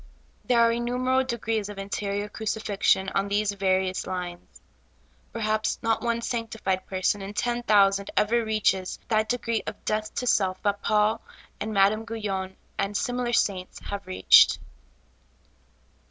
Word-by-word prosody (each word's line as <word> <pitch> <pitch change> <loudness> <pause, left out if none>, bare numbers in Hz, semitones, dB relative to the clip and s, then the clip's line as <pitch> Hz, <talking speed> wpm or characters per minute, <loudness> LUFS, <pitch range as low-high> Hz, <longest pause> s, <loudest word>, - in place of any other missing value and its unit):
There 240 -2 +3
are 230 0 +5
innumerable 250 +2 0
degrees 225 -3 -2
of 205 - -8
interior 200 +1 -3
crucifixion 210 -3 0
on 195 +1 -1
these 205 +1 +1
various 190 -1 0
lines. 175 -1 -6 0.7
Perhaps 215 -1 -1
not 225 -1 +1
one 235 -1 -1
sanctified 220 -6 -2
person 190 +2 0
in 195 +2 -7
ten 240 +1 -1
thousand 200 -3 +3
ever 230 +3 +3
reaches 215 -4 0
that 220 -1 +1
de 245 - +1
gree 230 -1 -1
of - - -7
death 215 0 -1
to 250 - -2
self 190 -5 +2
that 205 -1 0
Paul 210 +1 +2 0.4
and 215 +1 -3
Madame 215 +2 +2
Gu3^on, 195 -4 -4 0.2
and 200 +1 0
similar 245 -1 -1
saints, 190 -5 0
have 200 -2 -7
reached. 185 - +6
210 Hz, 140 wpm, -26 LUFS, 195-230 Hz, 0.7 s, reached